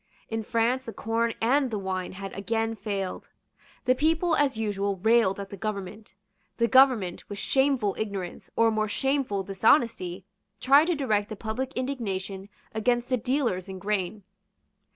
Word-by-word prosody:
In 225 Hz, 0 st, -2 dB
France 240 Hz, +3 st, 0 dB
the 225 Hz, -, -6 dB
corn 230 Hz, +1 st, -1 dB
and 265 Hz, +4 st, +3 dB
the 220 Hz, -, -2 dB
wine 190 Hz, -2 st, -3 dB
had 195 Hz, +1 st, -7 dB
again 225 Hz, +3 st, -1 dB
failed. 200 Hz, -4 st, -4 dB, 0.6 s
The 255 Hz, -, +5 dB
people, 320 Hz, +5 st, +2 dB
as 280 Hz, -6 st, +2 dB
usual, 200 Hz, -2 st, -1 dB
railed 215 Hz, 0 st, +3 dB
at 195 Hz, -1 st, -7 dB
the 200 Hz, -, -7 dB
government. 210 Hz, -1 st, -5 dB, 0.4 s
The 235 Hz, -, +3 dB
government, 255 Hz, -9 st, +4 dB
with 205 Hz, -, -6 dB
shameful 265 Hz, -5 st, +1 dB
ignorance 200 Hz, -5 st, -4 dB
or 230 Hz, 0 st, +4 dB
more 215 Hz, 0 st, 0 dB
shameful 265 Hz, -3 st, 0 dB
dishonesty, 195 Hz, -, +2 dB, 0.3 s
tried 280 Hz, +4 st, +6 dB
to 350 Hz, 0 st, +1 dB
direct 215 Hz, -8 st, 0 dB
the 215 Hz, -, -5 dB
public 230 Hz, +5 st, -4 dB
indignation 200 Hz, -7 st, -3 dB, 0.2 s
against 240 Hz, +3 st, 0 dB
the 255 Hz, -, +3 dB
dealers 235 Hz, -7 st, -1 dB
in 190 Hz, -, -6 dB
grain. 200 Hz, 0 st, -2 dB
220 Hz, 150 wpm, -27 LUFS, 195-255 Hz, 0.6 s, tried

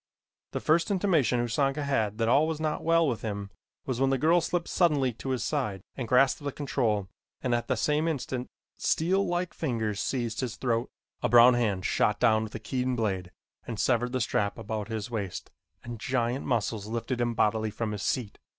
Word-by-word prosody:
The -, -, -1 dB
first 165 Hz, +2 st, +2 dB
intimation 175 Hz, -, +2 dB
Usanga 135 Hz, +4 st, 0 dB
had 110 Hz, -7 st, 0 dB
that 115 Hz, -1 st, +1 dB
all 145 Hz, +6 st, +4 dB
was 160 Hz, -1 st, -2 dB
not 155 Hz, -1 st, -2 dB
well 165 Hz, 0 st, +4 dB
with 120 Hz, -5 st, -1 dB
him 100 Hz, -2 st, -4 dB, 0.3 s
was 130 Hz, -1 st, -2 dB
when 135 Hz, -, +4 dB
the 135 Hz, -, +2 dB
girl 165 Hz, +6 st, +4 dB
slipped 170 Hz, 0 st, -1 dB
suddenly 145 Hz, -8 st, +2 dB
to 135 Hz, -, -7 dB
his 130 Hz, -4 st, -1 dB
side 110 Hz, -9 st, -2 dB
and 125 Hz, -4 st, -4 dB
grasped 135 Hz, +4 st, +3 dB
the 140 Hz, -, -2 dB
control 115 Hz, -9 st, -1 dB, 0.4 s
and 125 Hz, -, +1 dB
at 120 Hz, 0 st, 0 dB
the 130 Hz, -, +1 dB
same 150 Hz, +6 st, +1 dB
instant 130 Hz, -5 st, -2 dB, 0.3 s
steel 185 Hz, +5 st, +1 dB
like 175 Hz, -1 st, -2 dB
fingers 110 Hz, -8 st, -2 dB
seized 120 Hz, -4 st, -2 dB
his 125 Hz, -3 st, -2 dB
throat. 115 Hz, -2 st, -1 dB, 0.3 s
A -, -, +1 dB
brown 120 Hz, +2 st, +8 dB
hand 105 Hz, -7 st, 0 dB
shot -, -, +2 dB
down 110 Hz, 0 st, +4 dB
with 110 Hz, -, -7 dB
a -, -, -4 dB
keen 125 Hz, +3 st, -1 dB
blade 95 Hz, -6 st, -1 dB, 0.4 s
and 115 Hz, -3 st, -5 dB
severed 120 Hz, -1 st, +1 dB
the 130 Hz, 0 st, -1 dB
strap 100 Hz, -2 st, 0 dB
about 110 Hz, -2 st, -4 dB
his 110 Hz, 0 st, -4 dB
waist 100 Hz, -5 st, -4 dB, 0.3 s
and 120 Hz, -2 st, -7 dB
giant 120 Hz, +2 st, -1 dB
muscles 110 Hz, -4 st, -1 dB
lifted 115 Hz, +2 st, -2 dB
him 120 Hz, -1 st, 0 dB
bodily 110 Hz, 0 st, +1 dB
from 110 Hz, +1 st, -3 dB
his 105 Hz, -2 st, -4 dB
seat. 115 Hz, -6 st, -2 dB
120 Hz, 195 wpm, -28 LUFS, 110-140 Hz, 0.4 s, brown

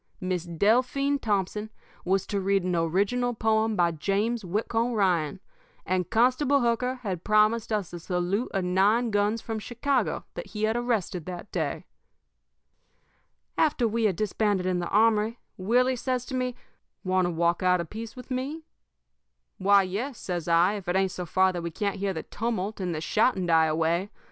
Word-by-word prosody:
Miss 185 Hz, -2 st, -2 dB
Delphine 250 Hz, -, +1 dB
Thompson 210 Hz, 0 st, -1 dB, 0.3 s
was 190 Hz, +1 st, +1 dB
to 200 Hz, -1 st, -2 dB
read 195 Hz, 0 st, +1 dB
an 180 Hz, -1 st, 0 dB
original 200 Hz, +9 st, +1 dB
poem 220 Hz, 0 st, +1 dB
by 175 Hz, -2 st, +3 dB
James 205 Hz, +8 st, -1 dB
Whitcomb 225 Hz, +6 st, -1 dB
Ryan, 180 Hz, -8 st, +1 dB, 0.5 s
and 185 Hz, -1 st, -1 dB
Constable 255 Hz, +4 st, +3 dB
Hooker 240 Hz, +2 st, +1 dB
had 185 Hz, -5 st, -3 dB
promised 215 Hz, +2 st, +3 dB
us 205 Hz, -5 st, -2 dB
a 175 Hz, -, -5 dB
salute 180 Hz, +6 st, -1 dB
of 195 Hz, -2 st, -1 dB
nine 205 Hz, +6 st, +2 dB
guns 205 Hz, +2 st, +1 dB
from 225 Hz, -1 st, -3 dB
Chicago 250 Hz, +5 st, -1 dB
that -, -, -7 dB
he 210 Hz, 0 st, -5 dB
had 220 Hz, +1 st, +2 dB
arrested 220 Hz, -8 st, -1 dB
that 180 Hz, +2 st, -7 dB
day. -, -, -2 dB, 1.7 s
"After 285 Hz, -6 st, +3 dB
we 225 Hz, +1 st, 0 dB
had 195 Hz, -4 st, +2 dB
disbanded 205 Hz, -1 st, 0 dB
in 185 Hz, -1 st, 0 dB
the 175 Hz, -, -3 dB
armory, 220 Hz, +1 st, +3 dB, 0.2 s
Willie 245 Hz, +7 st, +2 dB
says 250 Hz, 0 st, -2 dB
to 260 Hz, -, -8 dB
me: 255 Hz, -1 st, -1 dB, 0.5 s
"'Want 185 Hz, -1 st, +2 dB
to -, -, -1 dB
walk 170 Hz, +1 st, +1 dB
out 180 Hz, -1 st, +3 dB
a 170 Hz, -, -2 dB
piece 220 Hz, +6 st, -8 dB
with 250 Hz, +1 st, -11 dB
me?' 275 Hz, +6 st, -3 dB, 1.0 s
"'Why, 200 Hz, +1 st, +5 dB
yes,' 220 Hz, +8 st, -4 dB
says 175 Hz, -3 st, -4 dB
I, 170 Hz, +3 st, +4 dB
'if 195 Hz, -, -10 dB
it 175 Hz, -, 0 dB
ain't 190 Hz, -1 st, +2 dB
so 180 Hz, -2 st, -6 dB
far 190 Hz, +2 st, +3 dB
that 175 Hz, -, -3 dB
we 170 Hz, -, -3 dB
can't 200 Hz, +5 st, -2 dB
hear 195 Hz, 0 st, -1 dB
the 160 Hz, -4 st, -5 dB
tumult 220 Hz, -2 st, -3 dB
and 180 Hz, -3 st, -2 dB
the 155 Hz, -, -4 dB
shouting 195 Hz, +2 st, +1 dB
die 165 Hz, -2 st, +4 dB
away. 165 Hz, +5 st, 0 dB
205 Hz, 175 wpm, -27 LUFS, 180-230 Hz, 1.7 s, Why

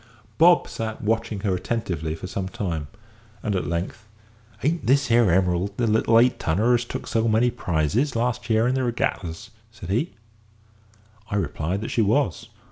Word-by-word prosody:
Bob 175 Hz, +1 st, +6 dB
sat 110 Hz, -1 st, -5 dB
watching 110 Hz, -1 st, -1 dB
her 100 Hz, -2 st, 0 dB
attentively 90 Hz, -6 st, -3 dB
for 80 Hz, -, -8 dB
some 95 Hz, +1 st, -4 dB
time, 90 Hz, -10 st, -3 dB, 0.6 s
and 105 Hz, -2 st, -1 dB
at 95 Hz, -, -1 dB
length 90 Hz, +6 st, -4 dB, 0.6 s
"Aren't 155 Hz, -3 st, 0 dB
this 140 Hz, +2 st, +3 dB
here 115 Hz, -3 st, +5 dB
Emerald 90 Hz, +2 st, +1 dB
the 120 Hz, -, +1 dB
little 110 Hz, +1 st, +3 dB
eight 125 Hz, +1 st, +3 dB
tonner 105 Hz, +10 st, +2 dB
as 120 Hz, 0 st, +2 dB
took -, -, -6 dB
so 115 Hz, 0 st, 0 dB
many 115 Hz, +3 st, +3 dB
prizes 95 Hz, -, 0 dB
last 120 Hz, +1 st, -1 dB
year 110 Hz, +1 st, +3 dB
in 125 Hz, -, +1 dB
the 130 Hz, 0 st, 0 dB
regattas?" 115 Hz, -4 st, -2 dB, 0.2 s
said 95 Hz, -5 st, -8 dB
he. 125 Hz, -, -1 dB, 1.1 s
I -, -, -2 dB
replied 95 Hz, -1 st, -2 dB
that 110 Hz, -, -4 dB
she 115 Hz, -, +2 dB
was. 110 Hz, -, +1 dB
110 Hz, 170 wpm, -24 LUFS, 95-120 Hz, 1.1 s, Bob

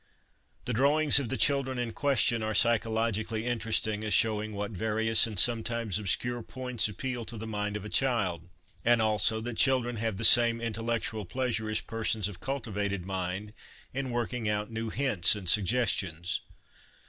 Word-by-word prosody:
The 125 Hz, -, -2 dB
drawings 145 Hz, +4 st, +4 dB
of 130 Hz, -5 st, -4 dB
the 130 Hz, -, -2 dB
children 135 Hz, -2 st, +2 dB
in 120 Hz, -2 st, -3 dB
question 135 Hz, -4 st, +2 dB
are 110 Hz, 0 st, -2 dB
psychologically 110 Hz, -1 st, +1 dB
interesting 110 Hz, -2 st, -1 dB
as 105 Hz, -2 st, +1 dB
showing 110 Hz, -1 st, +1 dB
what 100 Hz, +1 st, -4 dB
various 110 Hz, +3 st, +2 dB
and 110 Hz, -3 st, -7 dB
sometimes 115 Hz, -1 st, +1 dB
obscure 120 Hz, +4 st, -2 dB
points 125 Hz, -2 st, -2 dB
appeal 120 Hz, +4 st, -4 dB
to 115 Hz, -, -5 dB
the 110 Hz, -, -6 dB
mind 105 Hz, -1 st, -3 dB
of 105 Hz, -, -9 dB
a -, -, -6 dB
child; 95 Hz, -11 st, 0 dB, 0.3 s
and 120 Hz, 0 st, +4 dB
also, 110 Hz, 0 st, +2 dB
that 120 Hz, 0 st, -5 dB
children 125 Hz, -3 st, +2 dB
have 110 Hz, -2 st, -2 dB
the 115 Hz, -, +3 dB
same 115 Hz, 0 st, +7 dB
intellectual 115 Hz, -1 st, -3 dB
pleasure 115 Hz, +1 st, -2 dB
as 110 Hz, -, 0 dB
persons 110 Hz, -3 st, -1 dB
of 100 Hz, -3 st, -9 dB
cultivated 105 Hz, -8 st, -3 dB
mind 95 Hz, +2 st, -4 dB, 0.4 s
in 135 Hz, 0 st, -3 dB
working 120 Hz, -1 st, -2 dB
out 105 Hz, +1 st, -2 dB
new 115 Hz, 0 st, -4 dB
hints 110 Hz, -9 st, +3 dB
and 100 Hz, -3 st, -8 dB
suggestions. 95 Hz, -5 st, 0 dB
110 Hz, 160 wpm, -29 LUFS, 105-120 Hz, 0.4 s, same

